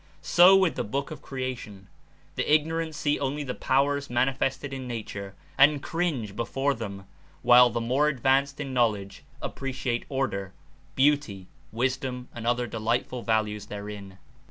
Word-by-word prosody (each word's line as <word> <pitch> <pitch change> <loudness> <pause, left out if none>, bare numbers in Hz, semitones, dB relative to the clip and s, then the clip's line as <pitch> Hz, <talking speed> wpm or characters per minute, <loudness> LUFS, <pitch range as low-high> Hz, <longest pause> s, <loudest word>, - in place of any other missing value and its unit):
So 180 +2 +7
with 190 -3 +3
the - - 0
book 140 +8 -3
of 155 - -8
creation 125 -7 -6 0.3
— - - -32
the - - -1
ignorant 160 +1 +1
see 150 0 0
only 145 +2 -2
the 125 -3 -4
powers 140 +2 +1
manifest 135 +2 0
ed 135 - -6
in 130 -1 -5
nature 100 -4 -6 0.2
and 145 +1 +6
cringe 150 - -2
before 135 +4 0
them, 100 -5 -7 0.4
while 125 0 +7
the 120 0 -2
more 130 +6 +2
advanced 140 +1 +1
in 140 -3 -4
knowledge 105 -5 0 0.2
appreciate 130 -3 -3
order, 100 -9 -2 0.4
beauty, 135 -9 +2 0.3
wis 125 +3 0
dom 125 -2 -6
and 115 -1 -6
other 120 0 +1
delightful 120 +2 -2
values 110 -2 -1
therein. 100 -2 -8
130 Hz, 155 wpm, -27 LUFS, 110-140 Hz, 0.4 s, So